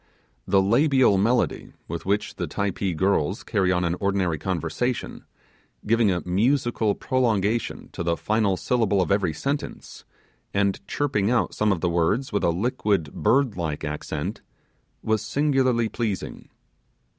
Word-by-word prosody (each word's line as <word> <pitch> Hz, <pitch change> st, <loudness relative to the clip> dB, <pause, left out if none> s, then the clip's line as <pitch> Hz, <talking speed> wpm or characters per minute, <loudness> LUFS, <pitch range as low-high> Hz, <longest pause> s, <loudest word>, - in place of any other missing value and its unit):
The 95 Hz, -1 st, +4 dB
labial 130 Hz, -1 st, +4 dB
melody 120 Hz, +5 st, 0 dB
with 85 Hz, +2 st, -6 dB
which 105 Hz, +1 st, 0 dB
the -, -, -2 dB
Typee 100 Hz, -2 st, -2 dB
girls 95 Hz, 0 st, +1 dB
carry 95 Hz, -5 st, +1 dB
on 90 Hz, -1 st, +1 dB
an 85 Hz, -, 0 dB
ordinary 95 Hz, -5 st, 0 dB
conversation, 95 Hz, -, -3 dB, 0.6 s
giving 115 Hz, 0 st, +3 dB
a 90 Hz, -1 st, -2 dB
musical 115 Hz, +2 st, +1 dB
prolongation 115 Hz, -3 st, 0 dB
to -, -, -6 dB
the 85 Hz, -1 st, 0 dB
final 105 Hz, -3 st, +1 dB
syllable 110 Hz, -4 st, +1 dB
of 90 Hz, -1 st, 0 dB
every 100 Hz, -4 st, +2 dB
sentence, 140 Hz, -, -5 dB, 0.5 s
and 100 Hz, -1 st, +1 dB
chirping 110 Hz, -8 st, 0 dB
out 120 Hz, -1 st, +1 dB
some 105 Hz, -1 st, +1 dB
of 90 Hz, -4 st, -1 dB
the 90 Hz, -, +1 dB
words 85 Hz, +10 st, 0 dB
with 100 Hz, -, 0 dB
a -, -, +3 dB
liquid, 100 Hz, -, 0 dB
bird 130 Hz, -4 st, +2 dB
like 80 Hz, -4 st, -3 dB
accent, 75 Hz, 0 st, -4 dB, 0.6 s
was 110 Hz, -1 st, +1 dB
singularly 130 Hz, -1 st, +1 dB
pleasing. 110 Hz, -4 st, -4 dB
100 Hz, 140 wpm, -24 LUFS, 90-120 Hz, 0.6 s, The